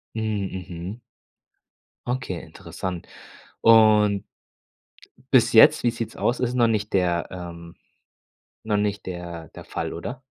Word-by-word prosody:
Hm, 110 - -2 0.3
mhm. 90 +3 -7 1.1
Okay, 125 -8 -3
interessant. 90 -2 -7 0.5
Und 105 -3 +5 1.1
bis - - +5
jetzt, - - +7
wie 120 - +3
sieht's 115 -1 -6
aus, 120 - 0
ist 125 -1 -1
noch 120 -2 +3
nicht 110 -2 -1
der 90 -2 +1
ähm, 85 -2 -9 0.9
noch 110 -1 +1
nicht 105 0 -1
der 85 -2 -7
der - - -10
Fall, - - -4
oder? 125 +10 -6
100 Hz, 120 wpm, -24 LUFS, 90-115 Hz, 1.1 s, jetzt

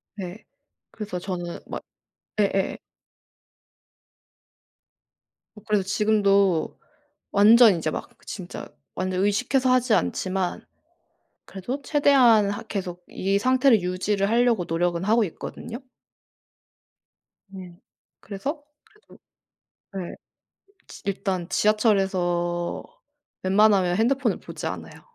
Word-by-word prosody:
네. 190 0 -7 0.5
그래서 205 -5 -5
저는 175 -2 -5
막 - - -6 0.6
예예예. 195 -1 +1 2.8
어 210 - -13
그래서 210 -2 +2
지금도 200 -3 +2 0.5
완전 215 +1 +7
인제 160 -2 -2
막 - - -6 0.2
진짜 185 -4 -7 0.3
완전 185 0 -1
의식해서 255 +5 +1
하지 250 -3 +3
않지만 185 0 -1 0.8
그래도 240 +9 -6
최대한 255 -9 +4
하 205 - -4
계속 180 -3 -5
이 195 +1 0
상태를 255 -2 +4
유지를 195 +3 -1
하려고 235 -5 +2
노력은 170 +1 -1
하고 220 +3 +3
있거든요. 210 +5 -7 1.7
네. 185 -3 -11 0.4
그래서 275 - -5 0.2
그래도 425 +1 -21 0.8
네. 185 -3 -5 0.7
지 - - -12
일단 190 -3 -2
지하철에서 185 -5 +1 0.6
웬만하면 190 -2 +3
핸드폰을 240 -1 +1
보지 - - -6
않아요. - - -7
200 Hz, 220 characters per minute, -24 LUFS, 185-225 Hz, 2.8 s, 완전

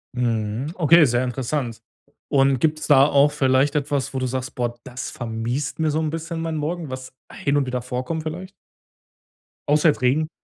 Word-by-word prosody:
Mhm, 115 +2 -1
okay, 170 -1 +6
sehr 120 -1 +1
interessant. 125 -2 -3 0.5
Und 135 -2 +3
gibt's 155 +1 0
da 140 -2 +7
auch 145 0 +4
vielleicht 135 0 +2
etwas, 140 -2 -1
wo 135 - -2
du 130 - -1
sagst: 130 0 -4
„Boah, 120 -1 -2
das 125 -1 -6
vermiest 120 +5 -3
mir 160 -1 +1
so 155 - 0
'n 160 -1 -1
bisschen 165 +1 -4
meinen 165 -1 -2
Morgen.“, 160 +1 -3
was 130 0 -7 0.2
hin 140 +1 0
und 140 - +1
wieder 125 -1 -3
vorkommt 125 +6 -4
vielleicht? 175 +4 -6 1.2
Außer 150 +2 +5
jetzt 145 - -1
Regen. 145 +5 +2
140 Hz, 180 wpm, -22 LUFS, 125-155 Hz, 1.2 s, da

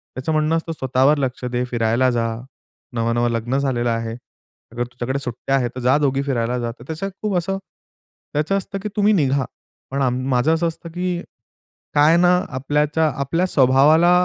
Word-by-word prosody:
त्याचं 130 +5 -3
म्हणणं 155 +1 +2
असतं 165 0 -4
"स्वतःवर 135 +1 +2
लक्ष 130 -2 -2
दे, 125 0 -1
फिरायला 120 +1 +1
जा, 115 -1 0 0.7
नवं-नवं 115 +1 +1
लग्न 115 +3 -1
झालेलं 130 -4 0
आहे. 115 -1 -2 0.6
अगर 120 +1 -2
तुझ्याकडे 125 +2 -4
सुट्ट्या 125 +1 -2
आहेत 125 -3 +1
तर - - -4
जा 125 +3 +4
दोघी 135 -2 +1
फिरायला 125 -3 -1
जा." 120 -1 -2
तर - - -11
त्याचं 160 +5 -4
खूप 210 -3 -1
असं 195 +3 -1 0.8
त्याचं 155 +7 +1
असतं 195 0 -4
की 210 - -2
तुम्ही 210 +1 +4
निघा. 140 -7 +2 0.5
पण 140 +1 -1
आम 125 -1 +1
माझं 130 +5 +3
असं 165 +1 +1
असतं 165 +1 -7
की, 180 0 -2 0.7
काय 150 +3 +6
ना 175 0 +5 0.3
आपल्याच्या 150 +4 +1
आपल्या 165 +6 0
स्वभावाला 145 +4 +5
135 Hz, 175 wpm, -21 LUFS, 125-160 Hz, 0.8 s, काय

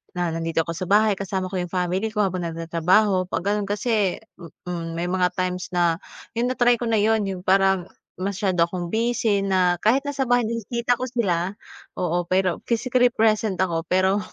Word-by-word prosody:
na 175 -1 0
nandito 165 0 0
ako 170 - -4
sa 185 -1 -4
bahay 210 +1 +4
kasama 190 -2 -3
ko 190 - -4
'yung 175 -1 -4
family 185 +4 -1
ko 210 -1 +2
habang 185 -2 -2
nagtatrabaho 180 +4 +1
'pag 180 - -3
ganon 205 0 0
kasi, 205 -2 0 0.2
hmm 170 -3 -11 0.2
hmm, 170 -2 -3
may 175 +1 -2
mga 180 -1 +1
times 180 0 -2
na 170 -2 +2 0.4
'yung 240 +1 +1
na-try 245 -2 +2
ko 240 - -3
na 225 -1 +2
'yun, 220 -1 +2
'yung 185 -2 -4
parang 190 -1 +3 0.3
masyado 190 -3 0
akong 175 -1 -5
busy 225 -2 +1
na 185 -3 +1
kahit 255 +8 +2
nasa 275 -3 -2
bahay 245 0 +3
nakikita 235 +2 -1
ko 255 - -2
sila, 195 -6 -1 0.4
oo, 175 -1 -1
pero 185 -1 +1
physically 245 +1 +2
present 220 -3 +1
ako 165 -2 -2
pero 190 +2 +2
190 Hz, 185 wpm, -23 LUFS, 180-220 Hz, 0.4 s, bahay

